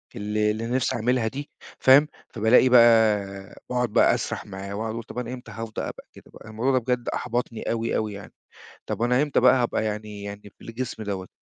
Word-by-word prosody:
اللي 105 0 0
اللي 110 +2 -4
أنا 120 - -2
نفسي 130 - 0
أعملها 120 0 +1
دي، 140 +5 -6 0.3
فاهم، 140 +3 +6 0.3
فبالاقي 115 +3 +4
بقى 110 -5 +4
وأقعد 125 -2 0
بقى - - +4
أسرح - - -4
معاه 100 0 -7
وأقعد 110 +1 -3
أقول 115 +1 -5
طب 125 - -11
أنا 125 0 -5
إمتى 125 -1 -9
هفض 115 -1 -6
أبقى - - -6
كده - - -15
بقى؟ - - -13
الموضوع 115 +5 0
ده 130 - +3
بجد 125 0 -2
أحبطني 120 -2 -3
أوي، 115 0 -1
أوي 110 -1 -1
يعني. 100 -1 -10 0.5
طب - - -4
أنا 125 +3 +3
إمتى 145 -2 +1
بقى 125 +1 +6
هابقى 115 -2 -1
يعني 105 -1 -5
يعني 100 0 -9
بالجسم 115 -1 -6
دوّة؟ 95 -2 -4
115 Hz, 200 wpm, -24 LUFS, 105-125 Hz, 0.5 s, فاهم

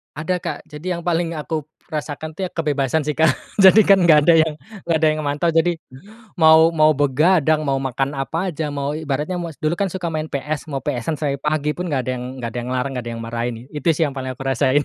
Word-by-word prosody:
Ada, 160 +5 -1
Kak. 170 -4 -6
Jadi 160 +5 -4
yang 170 - -5
paling 170 0 -1
aku 155 -1 -4 0.2
rasakan, 155 +1 -5
tuh, 190 - -2
ya, - - -5
kebebasan, 150 -2 0
sih, 150 0 -3
Kak. 160 -3 +4 0.2
Jadi, 200 +2 +8
kan, 195 -1 +5
nggak 160 -3 +6
ada 170 - +6
yang 155 - -3 0.3
nggak 170 -1 +2
ada 160 0 +3
yang 155 0 -1
mantau, 145 +4 0
jadi 165 +2 +3 0.6
mau 160 0 +7
mau 155 -1 +5
begadang, 155 +2 +3
mau 135 -1 +1
makan 135 +1 -2
apa 165 +7 -2
aja, 155 -1 -3
mau 140 0 -2
ibaratnya 155 +3 -2
mau 170 - -4
dulu, 155 +1 0
kan, 200 -1 0
suka 180 -1 -4
main 155 0 -2
PS, 150 +2 -3
mau 135 -2 -3
PS-an 125 +6 -2
sampai 140 -2 -2
pagi 150 0 0
pun 180 - -3
nggak 140 -4 0
ada - - +1
yang 125 - -6 0.2
nggak 115 - -3
ada 120 - -7
yang 120 - -6
ngelarang, 130 +2 -1
nggak 125 - -4
ada 120 - -4
yang 115 - -7
marahin. 115 +1 -3 0.2
Itu, 150 -1 -5
sih, 160 - +1
yang 140 - -4
paling 130 -1 -4
aku 130 - -13
rasain. 135 +2 +2
155 Hz, 240 wpm, -20 LUFS, 140-165 Hz, 0.6 s, Jadi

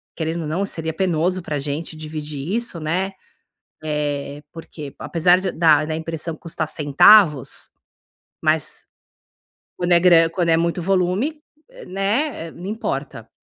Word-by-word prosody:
querendo 165 +1 -2
ou - - -4
não 175 +6 -1
seria 160 -4 -4
penoso 180 0 0
para 150 -3 -3
gente 150 +3 -5
dividir 155 +2 -5
isso, 235 -7 -2
né, 180 +5 -1 0.7
eh, 145 -1 -3
porque 155 -3 -9
apesar 175 +2 +3
de 185 -2 -2
da 155 -1 +3
impressão 160 0 -4
custar 160 -1 -4
centavos, 150 - +4 0.7
mas - - 0 0.9
quando 175 0 +1
é 170 - +6
grana 170 -2 +6
quando 170 0 -1
é 165 - +5
muito 170 +1 0
volume, 195 - 0 0.5
né, 195 - -1
não 175 - -10
importa. 220 +3 -4
165 Hz, 130 wpm, -21 LUFS, 155-185 Hz, 0.9 s, é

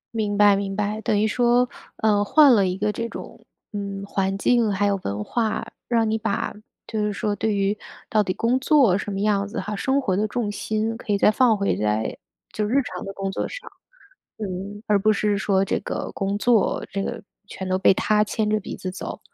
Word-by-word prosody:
明 210 -2 -1
白 205 -1 +6
明 195 0 -3
白， 210 +1 -2
等 210 -1 +1
于 215 - +3
说， 245 +2 +3 0.3
呃， 210 -2 +2
换 285 +5 +6
了 200 -4 +4
一 180 0 -2
个 210 +1 0
这 230 +2 -4
种， - - -9 0.3
嗯， 200 -2 -5
环 195 -1 -1
境 235 0 +2
还 200 +1 +1
有 200 0 +2
文 100 +1 -3
化， 225 - -1 0.2
让 230 -2 +2
你 220 +1 0
把 215 -2 -2 0.3
就 220 - -4
是 210 - 0
说 205 +1 -2
对 215 0 0
于 200 +1 +1 0.3
到 215 - +3
底 190 - -1
工 240 +3 +1
作 270 - +4
什 200 +1 -3
么 195 - -3
样 200 -1 +1
子 205 - -5
哈， 210 - -4
生 265 +7 +1
活 200 -9 0
的 210 +3 +1
重 215 -1 -2
心 215 +2 -2
可 215 - -5
以 200 - +3
再 210 - +5
放 230 -1 +3
回 200 0 +1
在 105 +1 -1 0.4
就 215 - -1
日 235 +7 +2
常 185 -7 -6
的 195 - -5
工 195 0 -3
作 - - -2
上。 - - -9 0.7
嗯， 200 +1 -6
而 210 -2 +3
不 215 +2 +3
是 210 0 +1
说 195 -1 +1
这 - - 0
个 - - -4
工 200 +1 -2
作 230 -1 +2
这 195 - -2
个 - - -5 0.2
全 190 -2 -6
都 185 0 0
被 - - +6
它 210 +2 +2
牵 215 0 -1
着 215 0 +1
鼻 195 - -7
子 185 - -5
走。 185 - -6
210 Hz, 235 characters per minute, -23 LUFS, 195-220 Hz, 0.7 s, 白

